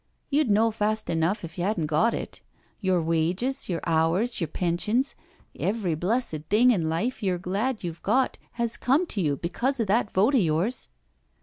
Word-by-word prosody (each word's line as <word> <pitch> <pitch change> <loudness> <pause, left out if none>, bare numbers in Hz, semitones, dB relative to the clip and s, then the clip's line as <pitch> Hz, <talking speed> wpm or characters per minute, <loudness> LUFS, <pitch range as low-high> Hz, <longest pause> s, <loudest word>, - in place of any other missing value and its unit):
You'd 290 -3 +2
know 220 +2 +3
fast 215 -1 -1
enough 165 +6 0
if 170 +2 -10
you - - 0
hadn't 190 -4 0
got 155 +9 +2
it. - - -6 0.4
Your 185 -3 +1
wages, 180 - 0
your 170 -2 -2
hours, 170 +8 +1
your 165 - 0
pensions, 185 - 0 0.5
every 200 -5 0
blessed 180 0 -1
thing 235 +5 +5
in 170 -8 0
life 220 +11 -2
you're 185 -3 0
glad 200 +7 -2
you've 170 -1 -5
got, 255 +5 +1
has 235 -1 0
come 275 +8 +2
to 215 - -3
you 145 -4 0
because 240 - -2
of 225 - +1
that 210 +2 +1
vote 210 +9 +3
of 260 - +4
yours." 175 +9 +1
200 Hz, 180 wpm, -26 LUFS, 170-235 Hz, 0.5 s, thing